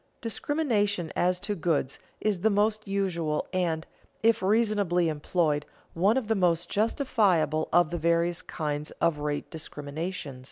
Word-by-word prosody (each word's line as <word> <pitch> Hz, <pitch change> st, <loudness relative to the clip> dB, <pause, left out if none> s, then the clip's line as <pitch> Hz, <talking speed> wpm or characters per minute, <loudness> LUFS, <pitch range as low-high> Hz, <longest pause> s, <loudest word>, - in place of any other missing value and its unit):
Discrimination 215 Hz, -, 0 dB
as 180 Hz, 0 st, +2 dB
to 205 Hz, -, -2 dB
goods 160 Hz, -7 st, -1 dB, 0.2 s
is 210 Hz, -4 st, 0 dB
the 215 Hz, +5 st, +3 dB
most 215 Hz, +1 st, +1 dB
usual 170 Hz, -6 st, -1 dB
and, 165 Hz, -3 st, 0 dB, 0.4 s
if 225 Hz, -2 st, +4 dB
reasonably 200 Hz, -4 st, +2 dB
employed, 150 Hz, -1 st, 0 dB, 0.3 s
one 200 Hz, +8 st, +3 dB
of 250 Hz, -5 st, -1 dB
the 225 Hz, -, +3 dB
most 175 Hz, -5 st, +1 dB
justifiable 200 Hz, -, +2 dB
of 175 Hz, -2 st, +4 dB
the 175 Hz, -, -2 dB
various 170 Hz, +1 st, +1 dB
kinds 150 Hz, -1 st, -3 dB
of 170 Hz, -3 st, +2 dB
rate 145 Hz, 0 st, -3 dB
discriminations. 150 Hz, -1 st, -5 dB
175 Hz, 135 wpm, -28 LUFS, 160-205 Hz, 0.4 s, if